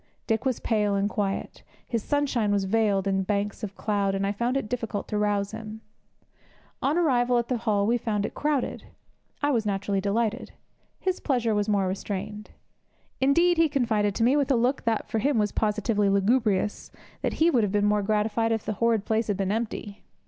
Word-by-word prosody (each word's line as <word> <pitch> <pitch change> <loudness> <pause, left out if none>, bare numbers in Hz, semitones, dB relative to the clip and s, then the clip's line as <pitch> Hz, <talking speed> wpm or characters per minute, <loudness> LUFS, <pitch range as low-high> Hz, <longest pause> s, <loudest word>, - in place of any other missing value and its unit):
Dick 225 +2 0
was 260 -3 0
pale 210 -3 +1
and 200 +1 +1
quiet; 200 -1 -3 0.3
his 230 -2 -1
sunshine 265 -8 0
was 200 -1 +1
veiled 200 -1 +1
in 195 -1 +1
banks 200 +1 -2
of 200 -2 -5
cloud, 200 -2 0
and 195 0 -1
I 200 - 0
found 235 +5 -1
it 270 - -3
difficult 225 -3 -3
to 210 - -1
rouse 205 -1 0
him. 220 0 -8 1.0
On 290 +5 +1
arrival 250 -7 +3
at 235 -1 -1
the 250 - +1
hall 210 -3 +1
we 240 +3 +2
found 210 -3 -1
it - - -5
crowded. 295 -4 -1 0.6
I 290 - +3
was 235 -5 +1
naturally 200 -1 -1
delighted; 210 +2 -1 0.5
his 370 -1 -1
pleasure 240 -5 0
was 210 0 0
more 200 -2 +2
restrained. 205 +2 -5 0.7
Indeed, 340 +6 +3
he 325 -1 +4
confided 220 -7 +1
to 225 - 0
me, 250 +4 +4
with 285 -3 +1
a 270 - +4
look 245 +3 0
that, 225 -2 0
for 220 - -1
him, 275 +3 +1
was 210 -2 +1
positively 210 -1 +1
lugubrious, 205 0 +1 0.3
that - - -1
he 330 +2 +3
would 245 - +3
have 205 -3 0
been 205 0 +2
more 210 0 +2
gratified 215 +2 0
if 225 -1 -1
the 215 - -1
horrid 230 -3 +2
place 220 0 0
had 205 -3 -1
been 195 -1 -1
empty. 215 -2 -4
215 Hz, 200 wpm, -26 LUFS, 205-240 Hz, 1.0 s, he